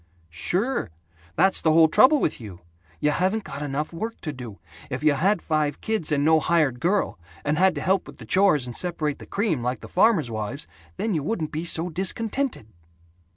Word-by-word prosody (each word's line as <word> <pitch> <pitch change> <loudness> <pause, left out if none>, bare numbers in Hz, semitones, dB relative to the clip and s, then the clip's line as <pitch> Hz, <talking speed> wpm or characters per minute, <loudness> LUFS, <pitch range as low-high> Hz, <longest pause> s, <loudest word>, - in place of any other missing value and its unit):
Sure! 190 - -1 0.5
That's 190 - +3
the 160 - +3
whole 160 0 +7
trouble 260 - +5
with 150 - -1
you! 95 -5 -10 0.4
You 150 - +2
haven't 190 +7 0
got 140 -4 -7
enough 145 +3 -3
work 225 +7 -5
to 155 - -4
do. 120 -6 -9 0.3
If 130 +1 -4
you 155 -1 +5
had 180 +6 +1
five 150 -2 0
kids 220 -8 -1
and 145 -1 +1
no 160 0 +5
hired 155 -7 +1
girl, 185 - 0 0.3
and 145 +1 +1
had 190 -2 +4
to 145 - -4
help 190 +3 +1
with - - -12
the - - -11
chores 185 -9 +3
and 120 -1 -6
separate 160 -5 -1
the - - -11
cream, 195 - -1
like 125 +2 -2
these - - -11
farmers' 180 - +3
wives, 110 +6 -3 0.3
then 220 -2 -1
you 155 - 0
wouldn't 160 -1 -3
be 160 +3 -3
so 165 0 0
discontented." 220 - -1
160 Hz, 200 wpm, -24 LUFS, 145-190 Hz, 0.5 s, whole